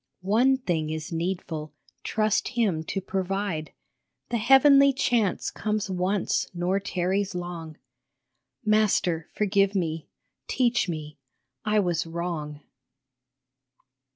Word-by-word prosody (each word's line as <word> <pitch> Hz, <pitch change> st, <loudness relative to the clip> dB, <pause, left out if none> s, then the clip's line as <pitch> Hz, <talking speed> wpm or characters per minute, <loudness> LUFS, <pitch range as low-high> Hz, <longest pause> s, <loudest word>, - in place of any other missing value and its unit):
One 245 Hz, +7 st, +4 dB
thing 170 Hz, -11 st, -1 dB
is 160 Hz, +2 st, -5 dB
needful, 165 Hz, -3 st, -3 dB, 0.3 s
trust 215 Hz, -1 st, +1 dB
him 210 Hz, -10 st, 0 dB
to 195 Hz, -, -3 dB
provide; 190 Hz, -3 st, -2 dB, 0.6 s
The 235 Hz, -, 0 dB
Heavenly 275 Hz, +3 st, +6 dB
Chance 235 Hz, -6 st, +1 dB
comes 215 Hz, -2 st, -2 dB
once 185 Hz, +2 st, 0 dB
nor 180 Hz, +3 st, 0 dB
tarries 190 Hz, +1 st, -1 dB
long 170 Hz, -3 st, -6 dB, 0.4 s
" 130 Hz, -, -45 dB
Master, 185 Hz, -6 st, +1 dB
forgive 200 Hz, -1 st, +2 dB
me, 165 Hz, -4 st, -2 dB, 0.4 s
teach 245 Hz, -6 st, +1 dB
me, 155 Hz, -3 st, -6 dB, 0.5 s
I 210 Hz, 0 st, +3 dB
was 175 Hz, -3 st, -1 dB
wrong 165 Hz, -3 st, -4 dB
190 Hz, 105 wpm, -26 LUFS, 165-215 Hz, 0.6 s, Heavenly